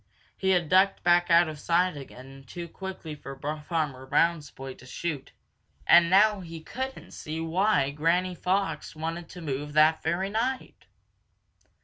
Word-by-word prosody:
He 190 Hz, -, -1 dB
had 175 Hz, -3 st, +2 dB
ducked 190 Hz, +3 st, +3 dB
back 175 Hz, 0 st, +4 dB
out 170 Hz, 0 st, +6 dB
of 155 Hz, -1 st, -7 dB
sight 175 Hz, +1 st, +1 dB
again 135 Hz, -1 st, -11 dB
too 170 Hz, +6 st, -7 dB
quickly 185 Hz, -3 st, -7 dB
for 135 Hz, -2 st, -9 dB, 0.3 s
Farmer 145 Hz, -6 st, -2 dB
Brown's 165 Hz, 0 st, +1 dB
boy 135 Hz, 0 st, -8 dB
to 125 Hz, -, -16 dB
shoot, 145 Hz, -1 st, -5 dB, 0.5 s
and 170 Hz, -1 st, +6 dB
now 205 Hz, +2 st, +5 dB
he 165 Hz, -3 st, -8 dB
couldn't 260 Hz, +11 st, -6 dB
see 155 Hz, +1 st, -6 dB
why 165 Hz, 0 st, +2 dB
old 140 Hz, +2 st, -6 dB
Granny 175 Hz, +4 st, +1 dB
Fox 180 Hz, -3 st, -2 dB
wanted 165 Hz, +2 st, -5 dB
to 180 Hz, -, -10 dB
move 145 Hz, -1 st, -4 dB
that 155 Hz, +1 st, +4 dB
very 190 Hz, +3 st, -1 dB
night. 250 Hz, +4 st, -3 dB
170 Hz, 155 wpm, -27 LUFS, 150-185 Hz, 0.5 s, out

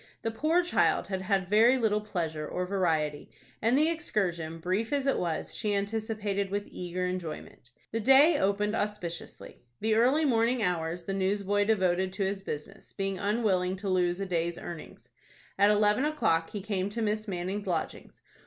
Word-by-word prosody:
The 225 Hz, -, -1 dB
poor 315 Hz, +10 st, +2 dB
child 175 Hz, -, +2 dB
had 190 Hz, -1 st, -2 dB
had 190 Hz, -1 st, 0 dB
very 225 Hz, +6 st, +5 dB
little 215 Hz, -3 st, +1 dB
pleasure 165 Hz, -7 st, -3 dB
or 180 Hz, -, -2 dB
variety, 160 Hz, -6 st, -1 dB, 0.3 s
and 230 Hz, +4 st, +3 dB
the 305 Hz, +2 st, +4 dB
excursion, 175 Hz, -, -2 dB
brief 185 Hz, +7 st, -1 dB
as 280 Hz, -2 st, 0 dB
it 275 Hz, -, +2 dB
was, 170 Hz, -3 st, -3 dB
she 210 Hz, -2 st, -1 dB
anticipated 205 Hz, -1 st, -2 dB
with 205 Hz, +1 st, -2 dB
eager 180 Hz, +1 st, -3 dB
enjoyment. 175 Hz, -8 st, -6 dB, 0.2 s
The 225 Hz, -, -1 dB
day 275 Hz, +7 st, +6 dB
opened 205 Hz, +2 st, +1 dB
auspiciously. 205 Hz, -6 st, -5 dB, 0.2 s
The 220 Hz, +1 st, +1 dB
early 255 Hz, +8 st, +3 dB
morning 235 Hz, -2 st, +2 dB
hours 170 Hz, -1 st, -1 dB
the 195 Hz, -, -3 dB
newsboy 200 Hz, +1 st, +1 dB
devoted 190 Hz, -3 st, +1 dB
to 195 Hz, 0 st, -1 dB
his 195 Hz, 0 st, -2 dB
business, 195 Hz, +3 st, -7 dB
being 195 Hz, -1 st, -3 dB
unwilling 200 Hz, -3 st, +1 dB
to 195 Hz, +1 st, -5 dB
lose 180 Hz, -1 st, +1 dB
a 195 Hz, -, -2 dB
day's 170 Hz, -2 st, -1 dB
earnings. 170 Hz, -2 st, -9 dB, 0.5 s
At 200 Hz, +1 st, +6 dB
eleven 210 Hz, +3 st, +3 dB
o'clock 290 Hz, -, +1 dB
he 205 Hz, -, -5 dB
came 195 Hz, -1 st, -2 dB
to 230 Hz, +3 st, -4 dB
Miss 215 Hz, +1 st, -1 dB
Manning's 190 Hz, +2 st, -3 dB
lodgings. 170 Hz, -3 st, -4 dB
200 Hz, 170 wpm, -29 LUFS, 180-220 Hz, 0.5 s, day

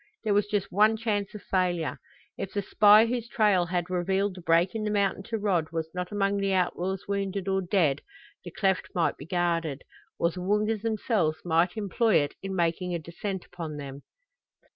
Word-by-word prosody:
There 215 Hz, -2 st, +1 dB
was 205 Hz, 0 st, +2 dB
just 205 Hz, -2 st, -2 dB
one 215 Hz, +3 st, +4 dB
chance 210 Hz, -3 st, -2 dB
of 210 Hz, -, -8 dB
failure. 180 Hz, -4 st, 0 dB, 0.4 s
If 195 Hz, -, -6 dB
the 200 Hz, -, 0 dB
spy 210 Hz, +3 st, +6 dB
whose 235 Hz, 0 st, -3 dB
trail 205 Hz, -7 st, +3 dB
had 175 Hz, 0 st, -1 dB
revealed 190 Hz, +2 st, 0 dB
the 180 Hz, -, -10 dB
break 170 Hz, +2 st, +3 dB
in 220 Hz, -1 st, -3 dB
the 210 Hz, -, -1 dB
mountain 200 Hz, -2 st, +1 dB
to 230 Hz, -1 st, -3 dB
Rod 185 Hz, -7 st, 0 dB
was 160 Hz, -1 st, -3 dB
not 180 Hz, +1 st, -4 dB
among 200 Hz, -1 st, +1 dB
the 195 Hz, -1 st, 0 dB
outlaws' 185 Hz, +1 st, -1 dB
wounded 200 Hz, -1 st, -2 dB
or 190 Hz, 0 st, +1 dB
dead 175 Hz, -7 st, +1 dB, 0.4 s
the -, -, -7 dB
cleft 195 Hz, -3 st, 0 dB
might 170 Hz, -2 st, +1 dB
be 140 Hz, -, -11 dB
guarded, 165 Hz, -5 st, -1 dB, 0.3 s
or 170 Hz, -, +1 dB
the 180 Hz, -, -7 dB
Woongas 210 Hz, +3 st, 0 dB
themselves 210 Hz, -8 st, 0 dB
might 175 Hz, +4 st, +2 dB
employ 215 Hz, +1 st, +1 dB
it 145 Hz, -1 st, +2 dB
in 195 Hz, 0 st, -4 dB
making 175 Hz, +1 st, 0 dB
a -, -, 0 dB
descent 175 Hz, +3 st, -5 dB
upon 165 Hz, -4 st, -7 dB
them. 140 Hz, -1 st, -7 dB
190 Hz, 190 wpm, -27 LUFS, 175-205 Hz, 0.4 s, spy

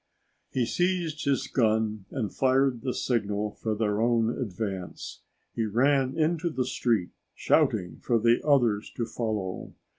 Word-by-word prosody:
He 125 Hz, -2 st, 0 dB
seized 175 Hz, +1 st, -1 dB
his 140 Hz, -1 st, +1 dB
gun 110 Hz, -4 st, 0 dB
and 115 Hz, -7 st, -3 dB
fired 130 Hz, -2 st, +2 dB
the 125 Hz, -, -1 dB
signal 105 Hz, -4 st, -1 dB
for 110 Hz, 0 st, -3 dB
their 105 Hz, -1 st, 0 dB
own 115 Hz, -1 st, +2 dB
advance. 95 Hz, -4 st, -5 dB, 0.3 s
He 115 Hz, -, -1 dB
ran 130 Hz, +5 st, +2 dB
into 165 Hz, +2 st, +1 dB
the 130 Hz, -5 st, -1 dB
street 115 Hz, -7 st, 0 dB, 0.2 s
shouting 85 Hz, -3 st, +1 dB
for 120 Hz, -, +2 dB
the 115 Hz, +2 st, +3 dB
others 120 Hz, -8 st, +2 dB
to 115 Hz, -, -1 dB
follow. 105 Hz, -6 st, -4 dB
115 Hz, 140 wpm, -27 LUFS, 105-135 Hz, 0.3 s, the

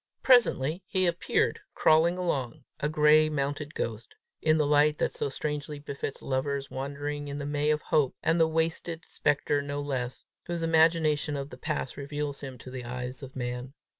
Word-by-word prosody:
Presently 185 Hz, -, +4 dB
he 185 Hz, -1 st, +1 dB
appeared, 170 Hz, 0 st, +1 dB, 0.2 s
crawling 165 Hz, +3 st, +4 dB
along, 135 Hz, -10 st, -2 dB, 0.2 s
a 150 Hz, -, 0 dB
gray 155 Hz, 0 st, +5 dB
mounted 145 Hz, +1 st, -2 dB
ghost, 115 Hz, 0 st, -4 dB, 0.3 s
in 155 Hz, 0 st, +4 dB
the 150 Hz, -, +2 dB
light 150 Hz, +1 st, +4 dB
that -, -, 0 dB
so -, -, -2 dB
strangely 150 Hz, +1 st, -3 dB
befits 140 Hz, -1 st, -6 dB
lovers 135 Hz, +1 st, -2 dB
wandering 145 Hz, +2 st, -4 dB
in 140 Hz, 0 st, -4 dB
the 145 Hz, -, -4 dB
May 145 Hz, +1 st, 0 dB
of 150 Hz, 0 st, +1 dB
hope, 145 Hz, -4 st, +2 dB
and 165 Hz, +1 st, +2 dB
the 165 Hz, -, +5 dB
wasted 165 Hz, +1 st, -1 dB
spectre 145 Hz, 0 st, +1 dB
no 145 Hz, 0 st, -4 dB
less, 135 Hz, -3 st, -3 dB, 0.2 s
whose 170 Hz, -1 st, -2 dB
imagination 160 Hz, -2 st, +3 dB
of 140 Hz, +1 st, -5 dB
the -, -, -7 dB
past 130 Hz, -, -3 dB
reveals 145 Hz, 0 st, -4 dB
him 135 Hz, -2 st, -7 dB
to 125 Hz, +2 st, -10 dB
the 130 Hz, -1 st, -6 dB
eyes 125 Hz, +2 st, -5 dB
of 135 Hz, -1 st, -9 dB
men. 125 Hz, +1 st, -4 dB
145 Hz, 175 wpm, -28 LUFS, 135-155 Hz, 0.3 s, gray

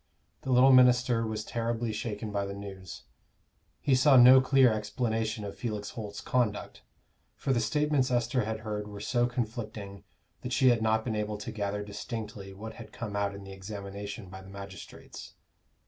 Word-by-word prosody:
The 130 Hz, -, -3 dB
little 130 Hz, +2 st, +7 dB
minister 125 Hz, -2 st, +5 dB
was 110 Hz, -1 st, -3 dB
terribly 115 Hz, -1 st, -2 dB
shaken 105 Hz, 0 st, -4 dB
by 100 Hz, -1 st, -1 dB
the 100 Hz, -, -6 dB
news. 95 Hz, -3 st, -9 dB, 0.8 s
He 140 Hz, -, +2 dB
saw 130 Hz, +1 st, +6 dB
no 125 Hz, +2 st, +9 dB
clear 130 Hz, -2 st, +5 dB
explanation 110 Hz, 0 st, -2 dB
of 100 Hz, -, -6 dB
Felix 105 Hz, -4 st, -4 dB
Holt's 100 Hz, -3 st, -7 dB
conduct; 120 Hz, -5 st, -1 dB, 0.5 s
for 135 Hz, -, -1 dB
the 120 Hz, -, +2 dB
statements 140 Hz, +3 st, +1 dB
Esther 120 Hz, 0 st, +1 dB
had 110 Hz, +1 st, -4 dB
heard 105 Hz, -1 st, -4 dB
were 105 Hz, -1 st, -8 dB
so 120 Hz, +3 st, +1 dB
conflicting 110 Hz, -4 st, -5 dB, 0.4 s
that 125 Hz, -, -4 dB
she 130 Hz, -, +5 dB
had 120 Hz, -2 st, +3 dB
not 110 Hz, 0 st, +1 dB
been 115 Hz, -3 st, -1 dB
able 105 Hz, 0 st, -2 dB
to 105 Hz, +3 st, -6 dB
gather 105 Hz, -1 st, -3 dB
distinctly 105 Hz, -1 st, -6 dB
what 110 Hz, +3 st, -8 dB
had 115 Hz, -, -11 dB
come 105 Hz, -3 st, -6 dB
out 100 Hz, -1 st, -1 dB
in 100 Hz, -, -9 dB
the 95 Hz, 0 st, -9 dB
examination 100 Hz, +1 st, -7 dB
by 95 Hz, +1 st, -10 dB
the 95 Hz, -, -13 dB
magistrates. 100 Hz, -1 st, -10 dB
110 Hz, 175 wpm, -29 LUFS, 100-120 Hz, 0.8 s, no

